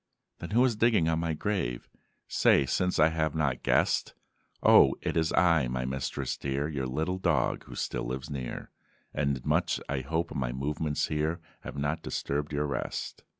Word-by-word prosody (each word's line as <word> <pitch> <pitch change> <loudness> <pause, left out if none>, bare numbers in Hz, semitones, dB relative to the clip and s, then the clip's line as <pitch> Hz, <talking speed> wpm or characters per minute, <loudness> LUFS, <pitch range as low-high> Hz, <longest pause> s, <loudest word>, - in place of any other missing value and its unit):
"Then, 85 - -6
who 120 +4 +4
is 120 -4 +1
digging 110 -6 +3
on 80 0 +1
my 85 -1 -1
grave? 75 -10 -2 0.4
Say 70 - +4
since 90 +7 0
I 80 +1 +5
have 80 0 -1
not 70 -5 0
guessed!" - - +1 0.5
"O - - +7
it - - -1
is 80 0 +1
I, 85 -7 +4
my 60 +1 -2
mistress 65 0 -3
dear, 70 +1 -2
Your 70 -4 -3
little 80 +8 -2
dog, - - +1
who - - -10
still - - -2
lives 65 +3 -4
near, 65 -5 -6 0.4
And 70 -3 -1
much - - +1
I 70 -1 -1
hope 80 +6 -2
my 60 -3 -1
movements 75 +3 -1
here 75 +2 -1 0.2
Have - - -8
not 75 +3 -1
disturbed 75 0 -3
your 75 0 0
rest?" 70 - -4
75 Hz, 175 wpm, -29 LUFS, 65-80 Hz, 0.5 s, O